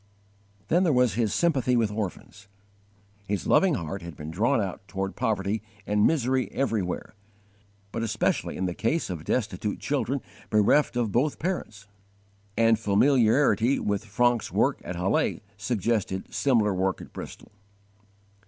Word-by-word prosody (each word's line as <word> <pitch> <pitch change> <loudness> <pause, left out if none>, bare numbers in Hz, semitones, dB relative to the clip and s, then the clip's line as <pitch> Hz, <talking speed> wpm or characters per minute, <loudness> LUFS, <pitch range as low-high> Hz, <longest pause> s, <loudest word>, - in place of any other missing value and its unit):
23. 155 -8 +4
His 110 +1 0
sympathy 135 -6 +2
with 115 -3 +2
orphans. 105 0 -6 0.8
His 100 -1 -2
loving 190 -5 +4
heart 95 -1 -4
had 85 -2 -8
been 75 +1 -6
drawn 115 +10 +2
out 95 -4 -3
toward 95 -1 -4
poverty 110 -3 -1 0.2
and 105 0 +3
misery 130 -4 +1
everywhere, 110 -9 -2 0.8
but 115 - -3
especially 110 -1 -1
in 95 - -1
the 90 - -2
case 115 - -1
of 85 -4 -5
destitute 105 -2 -2
children 140 -1 -1 0.3
bereft 110 +7 +3
of 115 -4 0
both 135 +8 +1
parents; 130 - -4 0.7
and 115 -1 +4
familiarity 120 +3 +3
with 100 -1 -1
Francke's 120 +2 +1
work - - +1
at 90 - -5
Halle 90 +3 0
suggested 105 -2 -2
similar 115 -7 +2
work 95 +1 0
at - - -12
Bristol. - - -9
110 Hz, 135 wpm, -26 LUFS, 100-125 Hz, 0.8 s, 23